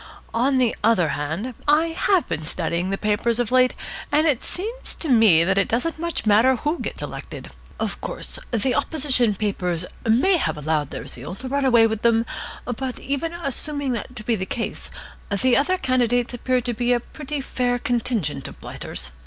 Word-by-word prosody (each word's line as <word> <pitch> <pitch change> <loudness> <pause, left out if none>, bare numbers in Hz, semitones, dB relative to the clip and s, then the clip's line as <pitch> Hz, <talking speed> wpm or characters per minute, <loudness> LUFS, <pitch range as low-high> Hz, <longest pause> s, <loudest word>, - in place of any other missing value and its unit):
On 260 +4 +2
the 250 -3 +2
other 210 -7 +4
hand, 160 - -3
I 310 +3 +4
have 350 +2 +2
been 155 - -3
studying 170 +2 -2
the 195 - -1
papers 215 +3 +1
of 245 -1 0
late, 255 0 +4 0.4
and 305 +2 +3
it 290 -7 +2
seems 450 +7 -3
to 325 - -4
me 220 - +6
that 195 +3 +2
it 195 - +2
doesn't 315 +8 -1
much 340 -5 -3
matter 220 +5 +5
who 300 +7 -2
gets - - -4
elected. - - -7 0.3
Of - - -2
course - - -3
the 245 +2 +1
opposition 265 -6 +2
papers 180 -4 -1 0.2
may 260 - +4
have 305 - -1
allowed 150 -1 0
their - - -6
zeal 140 +9 -5
to 255 - -7
run 280 +1 0
away 235 -3 +6
with 220 -1 -1
them, 230 -1 +3 0.4
but 250 +1 -3
even 280 +4 -2
assuming 285 -3 -2
that 245 +2 -4
to 215 - -7
be 230 +1 +1
the 190 -2 -4
case, 230 - -3 0.4
the 240 +5 +3
other 370 +7 +3
candidates 245 -4 +1
appear 250 +1 0
to 240 0 -2
be 245 +2 +1
a 240 - +2
pretty 295 +4 -6
fair 250 -2 0
contingent 240 - -1
of - - -11
blighters. 65 - -7
245 Hz, 185 wpm, -23 LUFS, 210-275 Hz, 0.4 s, me